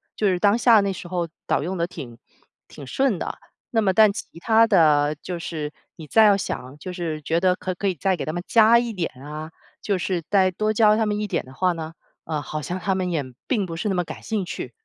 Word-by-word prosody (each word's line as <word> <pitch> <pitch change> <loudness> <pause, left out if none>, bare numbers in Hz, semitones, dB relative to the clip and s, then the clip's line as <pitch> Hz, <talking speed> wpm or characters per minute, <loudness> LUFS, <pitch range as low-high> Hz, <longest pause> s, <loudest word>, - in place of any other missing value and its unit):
就 210 - +1
是 185 -2 +2
当 205 +3 +3
下 235 -2 +6
那 200 -1 -1
时 180 - -8
候 175 -1 -2 0.2
倒 - - +1
用 180 +4 -3
得 170 -1 -1
挺 140 -10 -9 0.5
挺 140 - -11
顺 260 - +1
的。 - - -5 0.3
那 225 - +2
么 200 -3 +3
但 210 +1 +5
其 - - -5 0.2
它 225 +4 +4
的 155 -7 +3
就 180 - -5
是 155 -3 -5 0.2
你 155 - -10
再 220 +8 +5
要 205 -2 +5
想， 130 -7 -5
就 180 +5 -7
是 165 -3 -4
觉 165 +3 0
得 185 -1 +4
可 185 0 -4
可 200 +2 -1
以 185 - -2
再 190 +5 +1
给 - - -5
他 155 - -3
们 175 +2 -4
加 230 +1 +6
一 235 -1 -3
点 180 -5 -2
啊， 155 +3 -7 0.3
就 200 -2 0
是 180 -1 -2
再 190 -2 +4
多 215 +4 -1
教 215 -1 +4
他 220 0 +1
们 210 0 -1
一 210 - -2
点 185 -4 -1
的 130 - -14
话 180 +5 +1
呢， 160 -1 -6 0.3
呃， 155 -2 -3
好 155 +2 -5
像 180 +5 -4
他 190 +1 0
们 185 -1 -1
也 160 -3 0 0.3
并 215 -7 +1
不 165 -2 -6
是 210 +6 -2
那 190 - 0
么 180 -1 0
感 - - -9
兴 215 -4 -2
趣。 - - -6
185 Hz, 270 characters per minute, -23 LUFS, 160-210 Hz, 0.5 s, 下